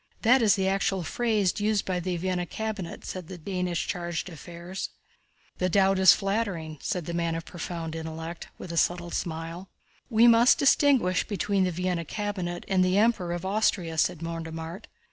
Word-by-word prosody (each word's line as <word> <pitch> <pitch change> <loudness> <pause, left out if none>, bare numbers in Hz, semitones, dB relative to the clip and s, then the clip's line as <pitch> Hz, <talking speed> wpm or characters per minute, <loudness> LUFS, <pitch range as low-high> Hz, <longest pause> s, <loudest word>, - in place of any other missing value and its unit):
That 245 +3 +5
is 210 -3 +5
the 190 -1 0
actual 195 -1 0
phrase 210 +1 +1
used 210 -1 +1
by 185 -1 -1
the 180 0 -2
Vienna 180 0 -1
cabinet," 215 -5 -5
said 185 -3 -6
the 185 - -8
Danish 180 0 -2
chargé 175 -1 -2
d'affaires. 175 +2 -7 0.7
"The 185 - +1
doubt 195 +1 +3
is 190 -1 +9
flattering," 195 -7 -2
said 180 -4 -2
"the 170 - -4
man 170 -1 0
of 165 0 -5
profound 165 -2 -5
intellect," 160 +1 -6
with 175 - -8
a 170 - -4
subtle 175 0 +1
smile. 165 +3 -4 0.4
"We 230 -1 +5
must 235 +1 +6
distinguish 270 -9 +3
between 200 -2 +1
the 180 - 0
Vienna 180 0 -1
cabinet 185 -3 -4
and 190 -2 +3
the 185 +1 +2
Emperor 210 -5 +2
of 175 +1 -4
Austria," 190 -4 +1
said 170 0 +1
Mortemart. 165 +3 -6
180 Hz, 170 wpm, -27 LUFS, 170-200 Hz, 0.7 s, is